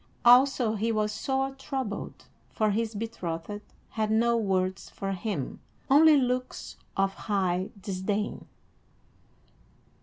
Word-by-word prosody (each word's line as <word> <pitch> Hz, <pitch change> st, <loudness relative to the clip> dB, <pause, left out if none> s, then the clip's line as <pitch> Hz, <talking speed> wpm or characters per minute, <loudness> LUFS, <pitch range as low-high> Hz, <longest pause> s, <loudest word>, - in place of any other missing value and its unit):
Also 245 Hz, -2 st, +6 dB
he 225 Hz, +2 st, 0 dB
was 215 Hz, -1 st, 0 dB
sore 270 Hz, +4 st, -1 dB
troubled, 265 Hz, -5 st, -5 dB, 0.2 s
for 215 Hz, -1 st, +1 dB
his 220 Hz, +1 st, -1 dB
betrothed 205 Hz, -3 st, -4 dB, 0.3 s
had 215 Hz, -1 st, -1 dB
no 235 Hz, +2 st, +3 dB
words 190 Hz, -4 st, 0 dB
for 195 Hz, 0 st, -4 dB
him, 190 Hz, -, -3 dB, 0.3 s
only 305 Hz, +2 st, +8 dB
looks 255 Hz, -1 st, -2 dB, 0.2 s
of 195 Hz, 0 st, +2 dB
high 190 Hz, -3 st, -1 dB
disdain. 200 Hz, +2 st, -3 dB
215 Hz, 110 wpm, -28 LUFS, 195-245 Hz, 0.3 s, only